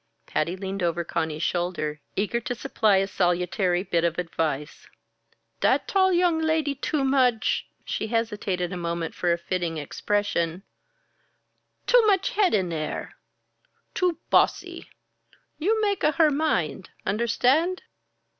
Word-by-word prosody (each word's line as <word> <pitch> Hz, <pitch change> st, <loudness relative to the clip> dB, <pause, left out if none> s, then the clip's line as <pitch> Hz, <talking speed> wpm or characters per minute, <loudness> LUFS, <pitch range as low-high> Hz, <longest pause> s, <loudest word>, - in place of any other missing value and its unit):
Patty 170 Hz, +4 st, -1 dB
leaned 195 Hz, +1 st, -5 dB
over 170 Hz, 0 st, 0 dB
Conny's 160 Hz, -1 st, -2 dB
shoulder, 170 Hz, -4 st, -2 dB
eager 210 Hz, +4 st, 0 dB
to 245 Hz, +1 st, -4 dB
supply 215 Hz, -3 st, +2 dB
a 195 Hz, 0 st, +1 dB
salutary 180 Hz, 0 st, +1 dB
bit 170 Hz, -4 st, 0 dB
of 170 Hz, -1 st, 0 dB
advice. 160 Hz, -4 st, -3 dB, 0.7 s
"Dat -, -, +2 dB
tall 380 Hz, -1 st, +3 dB
young 350 Hz, -2 st, +3 dB
lady 315 Hz, -2 st, +1 dB
too 280 Hz, +1 st, -1 dB
much 255 Hz, -4 st, +2 dB
" -, -, -42 dB
she 220 Hz, -, -3 dB
hesitated 210 Hz, -6 st, -1 dB
a -, -, -4 dB
moment 170 Hz, -1 st, -3 dB
for 175 Hz, -1 st, +1 dB
fitting 170 Hz, -1 st, -2 dB
expression 170 Hz, +2 st, -1 dB, 1.2 s
"too -, -, +5 dB
much 390 Hz, -2 st, +2 dB
head 400 Hz, -, +3 dB
in 180 Hz, -4 st, 0 dB
air. 155 Hz, -1 st, -4 dB, 0.8 s
Too 360 Hz, -3 st, +1 dB
bossy. -, -, +1 dB, 0.7 s
You 430 Hz, +8 st, +2 dB
make 405 Hz, -2 st, 0 dB
a 305 Hz, -, +3 dB
her 320 Hz, -2 st, +4 dB
mind? 190 Hz, -, -1 dB, 0.2 s
Understand?" 250 Hz, -, +1 dB
195 Hz, 130 wpm, -25 LUFS, -, 1.2 s, too